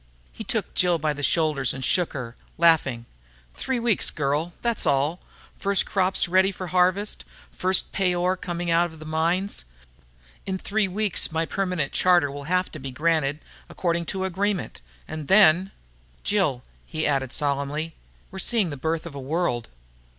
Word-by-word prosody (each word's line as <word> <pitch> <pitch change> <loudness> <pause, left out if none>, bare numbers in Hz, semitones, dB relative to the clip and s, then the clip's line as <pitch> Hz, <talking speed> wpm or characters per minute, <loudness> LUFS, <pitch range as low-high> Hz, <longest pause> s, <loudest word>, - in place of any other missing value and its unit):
He - - -8
took - - -2
Jill 175 -2 +3
by 155 -1 0
the 145 - -7
shoulders 150 -4 +1
and 130 -2 -4
shook 175 +5 +1
her, 125 -4 -6 0.2
laughing. 155 -8 +3 0.5
"Three 260 - -2
weeks, 235 -3 +2
girl, 150 +4 -1
that's 235 -2 0
all. 145 +5 +1 0.4
First 200 -1 +2
crops 190 -1 +1
ready 190 +2 +4
for 185 -1 -6
harvest, 185 +3 +1 0.3
first 185 0 +1
pay 185 -3 +1
ore 180 +1 +1
coming 175 -1 -3
out 170 +1 +4
of 160 - -13
the 155 - -10
mines. 170 - 0 0.8
In 190 -1 -1
three 205 +2 0
weeks 200 -2 +1
my 160 +1 0
permanent 180 -6 -1
charter 175 -6 +4
will 140 0 -7
have 180 +3 0
to 155 - -8
be 135 0 -6
granted, 150 +1 0 0.3
according 170 -1 -1
to 190 -1 -2
agreement, 190 - -2 0.3
and 155 -2 -6
then.... 190 -1 +6 0.5
"Jill," 170 -12 +1 0.2
he 155 -1 -2
added 135 -3 0
solemnly, 145 +3 -2 0.4
"we're 190 - -7
seeing 205 -4 +1
the 145 - -5
birth 160 +4 -2
of 170 - -7
a 140 - -6
world." 135 -4 -1
170 Hz, 165 wpm, -25 LUFS, 145-185 Hz, 0.8 s, then